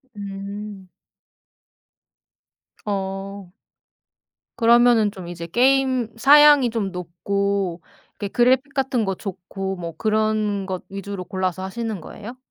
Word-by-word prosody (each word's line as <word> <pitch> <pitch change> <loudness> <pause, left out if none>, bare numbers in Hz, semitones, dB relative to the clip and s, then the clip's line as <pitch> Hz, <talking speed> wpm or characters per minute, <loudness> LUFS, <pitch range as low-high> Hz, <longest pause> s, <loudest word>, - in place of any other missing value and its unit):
음. 200 0 -7 2.0
어. 195 -1 -4 1.1
그러면은 235 -2 +5
좀 185 -3 -9
이제 170 -1 -6
게임 255 +3 +2
사양이 290 0 +7
좀 210 -4 -2
높고 185 +1 -2 0.4
이렇게 205 - -2
그래픽 260 +4 +2
같은 265 -5 0
거 195 - -1
좋고 195 0 -5
뭐 170 -3 -7
그런 215 -2 0
것 185 -2 -4
위주로 195 -1 -6
골라서 185 0 -2
하시는 215 -1 -4
거예요? 230 +9 -10
200 Hz, 210 characters per minute, -22 LUFS, 190-235 Hz, 2.0 s, 사양이